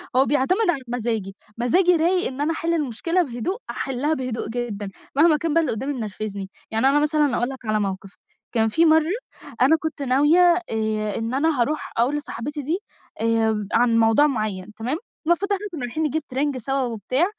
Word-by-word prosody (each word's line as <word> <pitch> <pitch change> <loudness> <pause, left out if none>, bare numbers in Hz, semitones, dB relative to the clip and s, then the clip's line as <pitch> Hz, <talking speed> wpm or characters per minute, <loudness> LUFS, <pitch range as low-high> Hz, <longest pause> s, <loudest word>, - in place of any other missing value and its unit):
هو 260 +1 +5
بيعتمد 320 - +2
على 280 -6 +1
مزاجي، 225 -5 -2 0.2
مزاجي 345 +10 +3
رايق 355 +3 +2
إن 270 +2 -5
أنا 305 - +1
أحل 335 +1 -1
المشكلة 330 +4 0
بهدوء، 275 - -3
أحلّها 275 +4 -1
بهدوء 255 -6 -3
جدًا، 220 -4 -4 0.3
مهما 310 +1 +5
كان 320 -1 -2
بقى 330 - +4
اللي 295 -7 -1
قدّامي 270 +6 -3
منرفزني، 210 -4 -5 0.2
يعني 225 +4 +2
أنا 285 +2 +4
مثلًا 300 -4 +2
أقول 240 +2 0
لك 265 -3 -9
على 215 0 +1
موقف، 195 -1 -4 0.3
كان 225 -2 +2
في 325 +10 +3
مَرّة 320 +1 +4 0.5
أنا 275 +5 +6
كنت 315 -2 -4
ناوية 285 +6 +4 0.3
آآ 215 -1 -1
إن 225 +2 -3
أنا 290 -2 +1
هاروح 305 +6 -1
أقول 245 +5 +2
لصاحبتي 290 +1 -5
دي، 320 +7 -1 0.4
آآ 220 -2 +1
عن 235 -1 +4
موضوع 225 +7 +5
معيّن 215 -6 -3
تمام، 240 +8 -2 0.3
المفروض 400 +4 +2
إحنا 400 +1 -3
كنا 320 -5 -6
رايحين 245 +6 -2
نجيب 310 +1 -1
ترنج 275 +1 -1
سوا 270 +3 -1
وبتاع، 250 - 0
260 Hz, 185 wpm, -23 LUFS, 225-310 Hz, 0.5 s, أنا